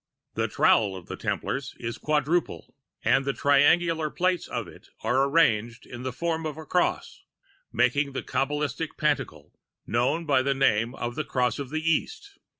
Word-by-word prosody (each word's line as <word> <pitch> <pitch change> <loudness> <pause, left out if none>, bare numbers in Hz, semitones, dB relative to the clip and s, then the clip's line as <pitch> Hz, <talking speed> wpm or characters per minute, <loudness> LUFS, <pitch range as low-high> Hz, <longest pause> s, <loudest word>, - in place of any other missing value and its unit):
] - - -60
"The - - +1
trowel 100 -3 +3
of 90 -2 -9
the - - -6
Templars - - -3
is 115 -1 -5
quadruple, 155 +3 -1 0.3
and 135 - +4
the 140 0 -1
triangular 155 +3 +3
plates 180 +2 0
of - - -4
it - - -15
are 125 +5 +2
arranged 115 -7 +2
in 120 -1 -9
the 130 0 -3
form 165 +4 -2
of 155 -1 -6
a 160 - -8
cross, - - -1 0.5
making 135 +4 +1
the - - -4
Kabalistic 150 +2 -2
pantacle 135 - -2 0.3
known 130 +9 0
by 140 -4 +3
the 140 +1 0
name 120 -2 +2
of 120 0 -4
the 155 - -3
Cross 125 -1 0
of 140 -3 -5
the 155 +2 -3
East. 405 - -1
140 Hz, 170 wpm, -26 LUFS, 125-160 Hz, 0.5 s, and